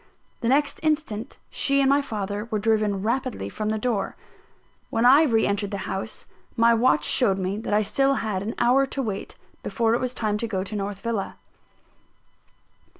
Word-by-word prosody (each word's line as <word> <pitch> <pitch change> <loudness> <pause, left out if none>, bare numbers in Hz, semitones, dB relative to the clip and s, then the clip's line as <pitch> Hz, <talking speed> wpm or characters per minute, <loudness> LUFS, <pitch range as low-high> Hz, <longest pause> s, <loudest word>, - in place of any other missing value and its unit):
The 230 - -2
next 280 +3 +2
instant 295 -7 -2
she 275 0 +2
and 275 - +3
my 280 +1 +4
father 205 -4 -4
were 215 - 0
driven 210 -2 +1
rapidly 235 - -2
from 215 - -3
the 220 - 0
door. 215 -3 -1 0.7
When 230 +1 +1
I 270 +5 +8
re 225 -6 +2
entered 200 0 -1
the 200 -2 -5
house, 195 +3 -5 0.3
my 230 0 +5
watch 225 -10 +3
showed 195 -6 +3
me 190 +2 -2
that 225 - -5
I 205 - +4
had - - -3
still 275 +6 +2
an 210 0 -3
hour 260 +3 +3
to 270 - -3
wait, 205 -4 -5 0.3
before 230 -2 0
it 235 - +1
was 255 0 -3
time 210 -2 -1
to 230 - -2
go 190 -4 -2
to 200 +2 -6
North 200 -1 -4
Villa. 230 -4 -3
220 Hz, 185 wpm, -24 LUFS, 205-250 Hz, 0.7 s, I